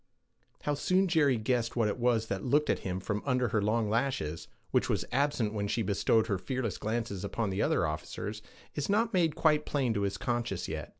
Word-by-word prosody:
How 145 - 0
soon 185 +6 +2
Jerry 150 -7 +3
guessed 115 +1 0
what 115 -3 +2
it 105 - -2
was 120 -2 +2
that 100 -3 -3
looked 145 +4 +2
at - - -1
him 95 -1 -3
from 105 +2 -2
under 125 -3 +1
her 105 -1 +1
long 110 +2 +1
lashes, 110 - -1 0.2
which - - +2
was - - 0
absent 130 -5 +1
when 100 -1 -1
she 115 +3 0
bestowed 110 +3 +2
her 100 -5 -1
fearless 125 -2 -3
glances 110 -3 -2
upon 100 +1 -2
the 95 +2 -1
other - - +2
officers, 105 +7 -4 0.3
is 145 +3 -3
not 220 +3 +2
made 165 -5 +2
quite 150 -2 +3
plain 135 -7 0
to 100 - -1
his 100 0 -1
conscience 120 0 -2
yet. - - -5
115 Hz, 205 wpm, -30 LUFS, 105-140 Hz, 0.3 s, Jerry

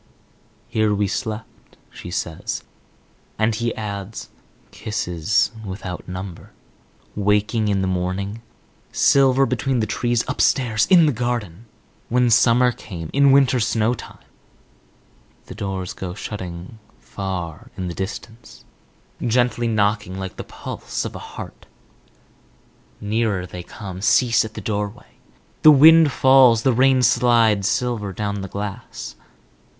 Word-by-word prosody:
"Here 110 -1 +1
we 100 0 0
slept," 110 +1 -6
she - - -10
says. 85 -2 -4 0.7
And 110 +1 +1
he 115 +2 -1
adds, 100 -1 -6 0.4
"Kisses 105 -4 -1
without 95 -2 -7
number." 90 -1 -8 0.6
"Waking 105 +2 +1
in 100 -2 +1
the - - 0
morning—" 95 +4 -3 0.5
"Silver 135 -1 +4
between 130 +1 -1
the 110 - +1
trees—" 120 +2 -1
"Upstairs—" 115 -5 +1
"In 175 -4 +7
the 150 - +3
garden—" 115 - -4 0.4
"When 125 0 +2
summer 125 +2 +4
came—" 85 -9 -8
"In 140 0 +5
winter 135 -2 +4
snowtime—" 115 +1 -2 1.2
The - - -9
doors 95 -1 -4
go 90 -3 -6
shutting 90 +1 -7 0.2
far 90 -5 -6
in 95 - -3
the 85 - -4
distance, 110 +5 -8 0.6
gently 120 0 +1
knocking 105 -3 0
like 95 -1 -6
the - - -6
pulse - - -6
of - - -6
a - - -6
heart. - - -10 1.3
Nearer 105 -3 -1
they 90 0 -8
come; 95 0 -9
cease 115 +3 +3
at 110 -1 -8
the 105 - -6
doorway. 105 +3 -5 0.4
The 155 - +8
wind 155 +1 +7
falls, 130 -4 +5
the 130 - +3
rain 130 +1 +3
slides 115 -6 +3
silver 120 -6 -1
down 100 +1 -3
the 95 - -5
glass. 100 - -7
110 Hz, 125 wpm, -21 LUFS, 95-120 Hz, 1.3 s, The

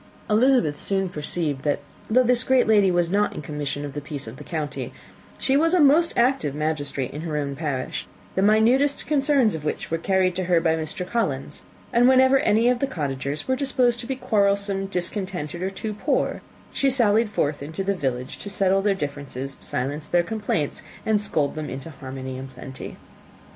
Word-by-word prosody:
Elizabeth 220 - +3
soon 195 -1 -1
perceived, 150 -3 -2
that 145 0 +1 0.3
though 255 +4 +5
this 250 0 +2
great 260 -1 +3
lady 205 -3 +5
was 175 -1 +1
not 205 +1 +1
in - - -5
the - - -13
commission 145 -1 -3
of 140 - -7
the 145 - -4
peace 145 -1 -4
for 110 - -7
the 125 - -11
county, 155 -3 -4 0.5
she 265 - +1
was 330 +5 +3
a - - +4
most 310 +3 +5
active 235 - +2
magistrate 145 -4 -2
in 150 - -6
her 160 -2 -3
own 140 -1 -2
parish, 140 -4 -3 0.3
the 190 - 0
minutest 235 +8 +3
concerns 275 -5 +3
of 160 - -5
which 150 - -3
were 165 - 0
carried 185 +1 +2
to 185 0 -2
her 175 -1 +3
by 165 -1 +2
Mr. 160 +4 -4
Collins; 150 - -2 0.3
and 245 +2 +5
whenever 260 +1 +5
any 220 +1 +3
of 250 -1 +3
the 275 - 0
cottagers 140 - -3
were 260 - +2
disposed 255 -3 +2
to 235 - -5
be 265 - -2
quarrelsome, 200 -5 +1
discontented, 180 -3 -3
or 190 - 0
too 210 +2 -5
poor, 260 +8 -1 0.3
she 275 - +2
sallied 230 -4 +3
forth 145 -7 -1
into 160 +7 -4
the 200 +1 +1
village 130 -7 -3
to 205 - -5
settle 195 -1 +2
their 200 0 +2
differences, 140 -4 -5
silence 145 +4 -4
their 175 0 +3
complaints, 205 -8 -2 0.2
and 215 -2 +2
scold 150 -8 0
them 155 -1 -5
into 135 +5 -7
harmony 130 -1 -7
and 135 0 -7
plenty. 130 0 -9
185 Hz, 195 wpm, -24 LUFS, 145-230 Hz, 0.5 s, though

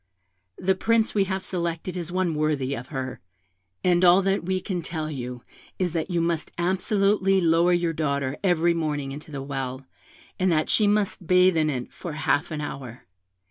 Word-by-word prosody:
The 190 +1 +2
Prince 225 +3 +1
we 200 -2 +2
have 190 0 -3
selected 170 0 -3
is 175 -1 -5
one 180 -2 0
worthy 150 -3 0
of 125 -1 -6
her; 130 -3 -5 0.6
and 180 0 +3
all 180 +2 +6
we 190 -1 0
can 180 -1 -3
tell 155 -2 -4
you 125 -3 -6 0.3
is, 180 -3 -1
that 165 +2 -2
you 175 -2 0
must 165 -1 -1
absolutely 195 +2 +2
lower 170 0 +3
your 175 -1 +1
daughter 140 -3 -1
every 175 -2 +3
morning 150 -4 -2
into 150 +3 -8
the 140 -3 -5
well, 135 -1 -4 0.5
and 185 -1 +2
that 155 -1 +1
she 210 - +4
must 205 -4 0
bathe 180 0 +5
in 155 -1 +2
it 125 -4 -4
for 170 -4 -6
half 150 +1 0
an 155 -2 -4
hour. 130 -5 -7
170 Hz, 180 wpm, -25 LUFS, 145-185 Hz, 0.6 s, all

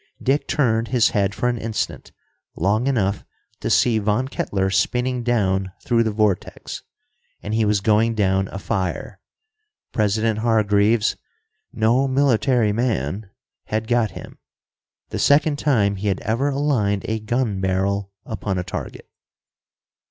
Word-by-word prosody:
Dick 140 +3 0
turned 115 -5 +1
his 120 -3 +3
head 100 0 0
for 125 - 0
an 120 -1 -1
instant, 110 0 -4 0.4
long 105 - +1
enough 100 -7 0 0.4
to - - -3
see 115 -3 +3
Von 105 +5 0
Kettler 95 -7 -1
spinning 125 +6 0
down 95 -6 0
through 120 -1 +3
the 115 - +1
vortex. 105 -3 -2 0.6
And 105 - -4
he 110 0 +2
was 105 -1 +2
going 110 +2 +2
down 95 -2 +1
afire. 95 -2 -3 0.7
President 110 +1 +1
Hargreaves, 110 -1 +2 0.5
"no 115 +5 +2
military 130 -4 +2
man," 105 - -2 0.4
had 110 +1 -2
got 120 -2 +2
him, - - -11 0.7
the - - -4
second 145 0 +3
time 105 -9 +2
he 100 +2 -3
had 95 -2 0
ever 120 +6 0
aligned 130 -9 0
a 110 0 -1
gun 110 -2 -1
barrel 95 +1 -1
upon 100 -3 -3
a 90 - -1
target. - - -7
110 Hz, 135 wpm, -22 LUFS, 100-120 Hz, 0.7 s, his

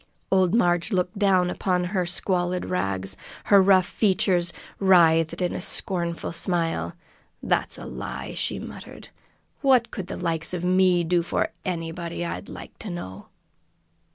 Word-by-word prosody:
Old 185 0 +3
Marg 175 -6 +2
looked 180 0 -1
down 185 -3 +3
upon 180 -1 0
her 180 -1 -1
squalid 180 0 -1
rags; 95 +1 -1 0.3
her 200 -1 +6
rough 190 -1 +5
features 185 -4 +1 0.3
writhed 170 -3 +4
with 180 -1 0
a - - -4
scornful 170 -2 -2
smile. 170 -1 0 0.5
"That's - - 0
a - - -8
lie!" - - -6
she - - -2
muttered. - - -10 0.5
"What 255 -4 +4
could 190 -3 -5
the - - -5
likes 165 0 -1
of 175 - -4
me 185 -1 +4
do 175 +1 +2
for 170 - -1
anybody, 170 -1 -4
I'd 170 - -5
like - - -10
to 220 - -6
know!" 95 - -7
180 Hz, 145 wpm, -25 LUFS, 170-190 Hz, 0.5 s, her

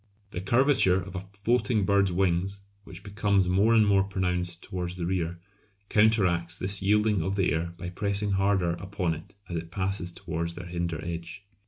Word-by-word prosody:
The 90 - -4
curvature 120 -3 +3
of 95 0 -8
a 95 +1 -6 0.2
floating 120 -2 +2
bird's 100 -1 +3
wings, 95 +2 0 0.2
which 95 0 -11
becomes 100 -2 +1
more 100 +6 +3
and 110 -1 +5
more 100 -1 +4
pronounced 90 -3 -2
towards 90 -1 -4
the 90 -2 -4
rear, 85 -1 -2 0.5
counteracts 95 -6 +2
this 95 +1 +1
yielding 105 0 +2
of 95 +4 -2
the 95 -5 +1
air 85 +2 -3
by 90 0 -5
pressing 100 +2 0
harder 95 -2 +2
upon 95 -1 -2
it 90 +5 -11
as 85 - -4
it 80 0 -6
passes 95 -1 -2
towards 85 0 -4
their 90 - -8
hinder 85 -2 -3
edge. 85 +2 -6
95 Hz, 175 wpm, -27 LUFS, 85-100 Hz, 0.5 s, and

